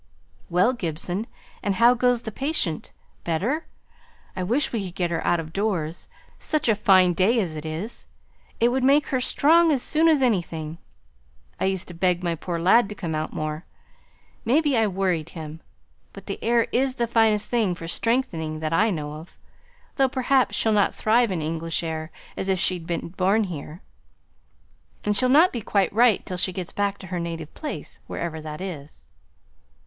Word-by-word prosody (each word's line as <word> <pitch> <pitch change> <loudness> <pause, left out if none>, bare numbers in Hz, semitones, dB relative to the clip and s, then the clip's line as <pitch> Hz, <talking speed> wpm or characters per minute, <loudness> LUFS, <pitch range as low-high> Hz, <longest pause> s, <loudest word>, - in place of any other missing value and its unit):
"Well, 180 +8 +3
Gibson, 180 +1 -3 0.3
and 200 -1 0
how 235 +3 +6
goes 245 -1 +1
the 220 - -5
patient? 265 - -2 0.3
Better? 220 - -1 0.7
I 185 - -3
wish 240 +11 0
we 220 -4 -1
could 180 0 -8
get 175 -2 -1
her 165 - -1
out 175 -1 +2
of 160 0 -7
doors, 175 -6 -2 0.3
such 310 -4 -1
a 225 - +5
fine 190 -3 +4
day 205 +7 +3
as 175 -7 -2
it 155 +1 -6
is. 170 +9 -6 0.5
It 235 - +4
would 255 +1 0
make 280 +3 +4
her 260 - +1
strong 325 +6 +4
as 270 -4 +1
soon 315 +1 +2
as 305 -4 +4
anything. 170 -8 -1 0.8
I - - 0
used 190 -1 -1
to 175 - -9
beg 180 +1 +1
my 170 -1 0
poor 170 +1 -4
lad 195 +6 +4
to 210 - -6
come 170 -5 -4
out 155 0 -2
more. 155 +1 -4 0.8
Maybe, 290 +3 +2
I 225 -2 +3
worried 180 -5 -1
him; 160 0 -8 0.5
but - - -11
the - - -6
air 235 0 +3
is 260 +1 +1
the 240 - 0
finest 225 -2 +2
thing 220 -7 +1
for 165 -1 -8
strengthening 170 -8 -1
that 155 0 -2
I 215 +7 +3
know 150 -6 -3
of. 155 +3 -11 0.6
Though, 270 -2 +4
perhaps, 260 0 +2
she'll 220 - +2
not 205 -2 +2
thrive 230 0 +3
in 170 -4 -2
English 165 +2 -2
air 160 -1 -4 0.3
as 195 - -3
if 190 -1 +1
she'd 175 -2 0
been 170 -1 -3
born 190 +5 +2
here; 170 -2 -7 1.2
and 210 0 +1
she'll 255 +4 +2
not 315 +7 +6
be 235 - -3
quite 200 -2 +1
right 230 -1 +4
till 180 - -5
she 185 +1 0
gets 180 -1 -6
back 200 0 -1
to 190 - -11
her 175 - -1
native 165 -2 -5
place, 305 - -7
wherever 160 -2 -4
that 155 +1 -7
is." 155 -6 -8
190 Hz, 185 wpm, -24 LUFS, 165-235 Hz, 1.2 s, how